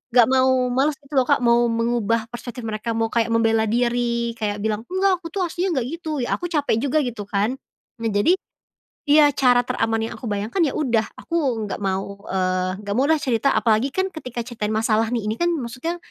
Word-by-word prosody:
gak 245 Hz, -, +8 dB
mau 260 Hz, -1 st, +3 dB
males 280 Hz, +4 st, +1 dB
gitu 280 Hz, +2 st, -16 dB
loh, 255 Hz, -, +1 dB
Kak, 280 Hz, -3 st, +2 dB
mau 235 Hz, 0 st, +4 dB
mengubah 230 Hz, 0 st, 0 dB
perspektif 240 Hz, 0 st, -7 dB
mereka 220 Hz, +1 st, -3 dB
mau 225 Hz, 0 st, 0 dB
kayak 235 Hz, -1 st, +1 dB
membela 225 Hz, -1 st, +2 dB
diri 235 Hz, 0 st, 0 dB
kayak 205 Hz, -1 st, -2 dB
bilang, 220 Hz, +1 st, -2 dB
"Enggak 375 Hz, 0 st, +1 dB
aku 335 Hz, -, -7 dB
tuh 380 Hz, +2 st, -2 dB
aslinya 345 Hz, -6 st, -1 dB
gak -, -, -5 dB
gitu" 315 Hz, -5 st, -3 dB
ya -, -, -1 dB
aku 350 Hz, -, -3 dB
capek 290 Hz, -9 st, 0 dB
juga 285 Hz, +3 st, +1 dB
gitu 225 Hz, -5 st, -5 dB
kan, 210 Hz, +6 st, -1 dB, 0.4 s
nah 230 Hz, -, -1 dB
jadi 210 Hz, -, +3 dB, 0.7 s
iya 295 Hz, 0 st, +6 dB
cara 250 Hz, -2 st, +3 dB
teraman 225 Hz, -1 st, -1 dB
yang -, -, -5 dB
aku 240 Hz, -, -6 dB
bayangkan 210 Hz, -, -2 dB
ya -, -, -3 dB
udah 235 Hz, -7 st, +1 dB
aku 270 Hz, -10 st, -1 dB
nggak -, -, -5 dB
mau, 195 Hz, 0 st, -3 dB
eee, 185 Hz, +1 st, -1 dB
gak 200 Hz, +1 st, -3 dB
mau 275 Hz, -, +3 dB
deh 320 Hz, -, +4 dB
cerita 255 Hz, +2 st, +1 dB
apalagi 225 Hz, +4 st, +2 dB
kan 380 Hz, 0 st, 0 dB
ketika 250 Hz, -6 st, -6 dB
ceritain 220 Hz, -3 st, -3 dB
masalah 220 Hz, 0 st, +2 dB
nih 230 Hz, -3 st, -1 dB
ini 215 Hz, +1 st, -1 dB
kan 345 Hz, -, +2 dB
maksudnya, 270 Hz, +6 st, -4 dB
235 Hz, 205 wpm, -22 LUFS, 220-275 Hz, 0.7 s, gak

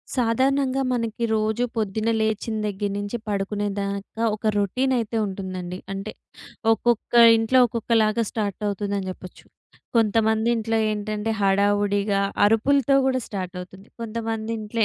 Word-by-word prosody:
సాధారణంగా 260 Hz, +3 st, +1 dB
మనకి 230 Hz, -1 st, -2 dB
రోజు 220 Hz, +2 st, 0 dB
పొద్దున్న 220 Hz, +1 st, -1 dB
లేచిన 220 Hz, +1 st, -1 dB
దగ్గర 205 Hz, 0 st, -2 dB
నుంచి 205 Hz, +3 st, -3 dB
పడుకునే 205 Hz, 0 st, -2 dB
దాకా 200 Hz, +3 st, -4 dB
ఒక 215 Hz, +1 st, -3 dB
రొటీన్ 255 Hz, +7 st, +1 dB
అయితే 230 Hz, -1 st, -2 dB
ఉంటుందండి. 185 Hz, -2 st, -5 dB, 0.2 s
అంటే 195 Hz, +2 st, -5 dB, 0.6 s
ఒక్కొక్క 235 Hz, +1 st, 0 dB, 0.2 s
ఇంట్లో 225 Hz, +3 st, +3 dB
ఒక్కొక్కలాగా 230 Hz, -1 st, +1 dB
స్టార్ట్ 205 Hz, -4 st, -3 dB
అవుతుందని 200 Hz, -1 st, -2 dB
చెప్పొచ్చు. 185 Hz, 0 st, -12 dB, 0.5 s
కొంతమంది 220 Hz, 0 st, +2 dB
ఇంట్లో 225 Hz, 0 st, -1 dB
ఏంటంటే 210 Hz, +1 st, -3 dB
హడావుడిగా 200 Hz, 0 st, +2 dB, 0.2 s
అరుపులతో 275 Hz, +5 st, +3 dB
కూడా 260 Hz, -1 st, +1 dB
స్టార్ట్ 185 Hz, -2 st, -5 dB
అవుతుంది. 190 Hz, +3 st, -11 dB
కొంతమంది 225 Hz, 0 st, -3 dB
ఇంట్లో 215 Hz, +2 st, -5 dB
215 Hz, 120 wpm, -23 LUFS, 200-230 Hz, 0.6 s, ఇంట్లో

